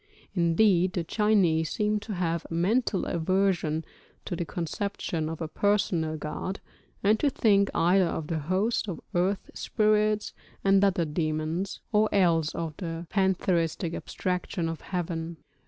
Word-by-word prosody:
Indeed 180 Hz, +1 st, +3 dB
the 175 Hz, -, -1 dB
Chinese 175 Hz, -5 st, +2 dB
seem 210 Hz, +3 st, 0 dB
to 210 Hz, 0 st, -6 dB
have 170 Hz, -2 st, -1 dB
a 165 Hz, -, -4 dB
mental 200 Hz, +4 st, +1 dB
aversion 175 Hz, -2 st, 0 dB, 0.4 s
to -, -, -3 dB
the 170 Hz, -, -3 dB
conception 170 Hz, -2 st, -3 dB
of 165 Hz, +1 st, -6 dB
a 160 Hz, -, -2 dB
personal 175 Hz, -4 st, +1 dB
god, 155 Hz, +6 st, -4 dB, 0.4 s
and 215 Hz, +2 st, +4 dB
to 290 Hz, -, +3 dB
think 200 Hz, -6 st, +3 dB
either 180 Hz, +3 st, +4 dB
of 160 Hz, -1 st, -3 dB
the 160 Hz, +1 st, -2 dB
host 190 Hz, +9 st, 0 dB
of 170 Hz, -, -4 dB
earth 190 Hz, +3 st, 0 dB
spirits 215 Hz, 0 st, +1 dB, 0.3 s
and 195 Hz, 0 st, +4 dB
other 185 Hz, -4 st, +2 dB
demons, 155 Hz, +4 st, -2 dB
or 215 Hz, 0 st, +3 dB
else 170 Hz, -5 st, +2 dB
of 165 Hz, -2 st, -3 dB
the 165 Hz, -2 st, -5 dB
pantheistic 180 Hz, -3 st, +1 dB
abstraction 180 Hz, -2 st, -3 dB
of 165 Hz, -1 st, -4 dB
heaven. 170 Hz, -2 st, -4 dB
180 Hz, 140 wpm, -27 LUFS, 165-200 Hz, 0.4 s, and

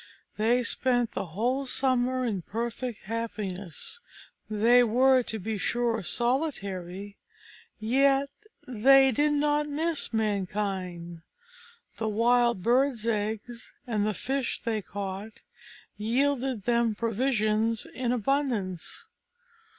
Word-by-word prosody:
They 235 Hz, +4 st, +2 dB
spent 245 Hz, 0 st, +1 dB
the -, -, -4 dB
whole 245 Hz, +10 st, -1 dB
summer 255 Hz, -1 st, +1 dB
in 205 Hz, -6 st, -1 dB
perfect 235 Hz, +4 st, -4 dB
happiness: 210 Hz, -, -5 dB, 0.5 s
they 230 Hz, +4 st, +5 dB
were, 255 Hz, +3 st, +4 dB
to 225 Hz, -2 st, -4 dB
be 215 Hz, +1 st, -4 dB
sure, 235 Hz, -1 st, 0 dB
solitary, 200 Hz, -, -2 dB, 0.6 s
yet 270 Hz, +5 st, +3 dB, 0.4 s
they 265 Hz, +3 st, +5 dB
did 295 Hz, +5 st, +2 dB
not 295 Hz, 0 st, +1 dB
miss 315 Hz, +1 st, -2 dB
mankind. 190 Hz, -5 st, -2 dB, 0.8 s
The 220 Hz, -1 st, -1 dB
wild 235 Hz, -1 st, +2 dB
birds' 245 Hz, 0 st, +2 dB
eggs, 220 Hz, +2 st, -3 dB
and 220 Hz, -4 st, 0 dB
the 210 Hz, -1 st, 0 dB
fish 270 Hz, +2 st, -2 dB
they 225 Hz, -3 st, -1 dB
caught, 200 Hz, +2 st, -6 dB, 0.6 s
yielded 255 Hz, +1 st, 0 dB
them 235 Hz, -1 st, +2 dB
provisions 225 Hz, -1 st, 0 dB
in 250 Hz, -2 st, -1 dB
abundance. 235 Hz, -, -1 dB
230 Hz, 105 wpm, -28 LUFS, 210-255 Hz, 0.8 s, they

